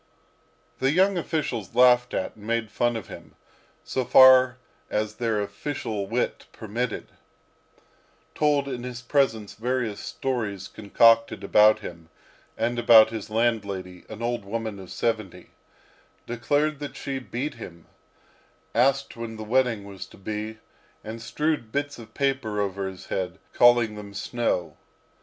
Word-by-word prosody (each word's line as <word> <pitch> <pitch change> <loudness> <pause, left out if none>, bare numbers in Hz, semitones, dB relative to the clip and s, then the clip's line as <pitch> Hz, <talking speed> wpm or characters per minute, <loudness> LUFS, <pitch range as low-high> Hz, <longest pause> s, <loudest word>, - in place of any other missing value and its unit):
The 135 - +2
young 190 +4 +3
officials 145 - -3
laughed 125 0 +5
at 95 - -3
and 105 0 -13
made 115 -2 -1
fun 120 +1 +1
of 110 -6 -5
him, - - -12 0.5
so 130 - -2
far 130 0 +7 0.3
as 105 0 -1
their 115 -3 0
official 105 0 -4
wit 120 +4 -2
permitted; 115 +2 -4 1.2
told 145 -2 +2
in 125 -3 -4
his 125 0 -7
presence 115 -8 +1
various 120 -2 -2
stories 105 -8 -3
concocted 115 +2 +3
about 110 +1 +5
him, 85 -5 -9 0.5
and 120 +2 0
about 110 -2 +7
his 110 -2 -6
landlady, 100 -5 -1
an 110 +1 -7
old 120 -2 -1
woman 110 0 -4
of 95 - -11
seventy; 110 -5 -3 0.7
declared 145 +5 0
that 145 -1 -6
she 135 -1 -4
beat 130 +3 -4
him; 85 -8 -11 0.9
asked 135 +1 +2
when 115 -1 -6
the 110 - -7
wedding 115 -2 +1
was 100 -1 -9
to - - -17
be; 110 +2 -5 0.5
and 110 +1 -7
strewed 150 -2 -2
bits 145 0 -2
of 115 - -13
paper 135 -7 -1
over 100 -1 -2
his 95 -1 -11
head, 90 -1 -3 0.2
calling 120 -2 +5
them 100 -1 -9
snow. 115 -4 -2
115 Hz, 140 wpm, -25 LUFS, 105-125 Hz, 1.2 s, far